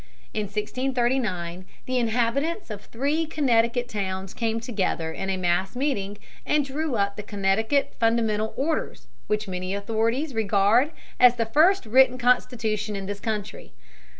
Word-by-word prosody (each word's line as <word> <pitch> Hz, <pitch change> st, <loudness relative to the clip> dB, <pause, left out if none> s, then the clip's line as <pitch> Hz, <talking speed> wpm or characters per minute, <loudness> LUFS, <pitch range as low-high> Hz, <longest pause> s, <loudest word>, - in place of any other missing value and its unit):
In 215 Hz, -, -1 dB
1639 215 Hz, -5 st, -1 dB, 0.2 s
the 255 Hz, 0 st, 0 dB
inhabitants 245 Hz, -, 0 dB
of 205 Hz, -1 st, -6 dB
three 290 Hz, +7 st, -1 dB
Connecticut 245 Hz, -5 st, +1 dB
towns 190 Hz, -4 st, -4 dB
came 225 Hz, -1 st, -1 dB
together 195 Hz, -8 st, -2 dB
in 190 Hz, +4 st, -4 dB
a 190 Hz, -, 0 dB
mass 185 Hz, +3 st, 0 dB
meeting, 205 Hz, -7 st, -1 dB, 0.3 s
and 295 Hz, -2 st, +1 dB
drew 285 Hz, 0 st, -2 dB
up 200 Hz, -1 st, 0 dB
the -, -, -3 dB
Connecticut 210 Hz, +7 st, 0 dB
Fundamental 225 Hz, -2 st, +1 dB
Orders, 310 Hz, +3 st, -2 dB, 0.2 s
which 210 Hz, 0 st, -1 dB
many 185 Hz, +1 st, -3 dB
authorities 230 Hz, +8 st, -1 dB
regard 220 Hz, +5 st, +3 dB, 0.3 s
as 250 Hz, -1 st, +7 dB
the 230 Hz, -1 st, 0 dB
first 315 Hz, -, +4 dB
written 255 Hz, +3 st, +5 dB
constitution 225 Hz, -4 st, +1 dB
in 195 Hz, -1 st, -4 dB
this 205 Hz, +1 st, -5 dB
country. 210 Hz, -1 st, -5 dB
225 Hz, 140 wpm, -25 LUFS, 200-255 Hz, 0.3 s, as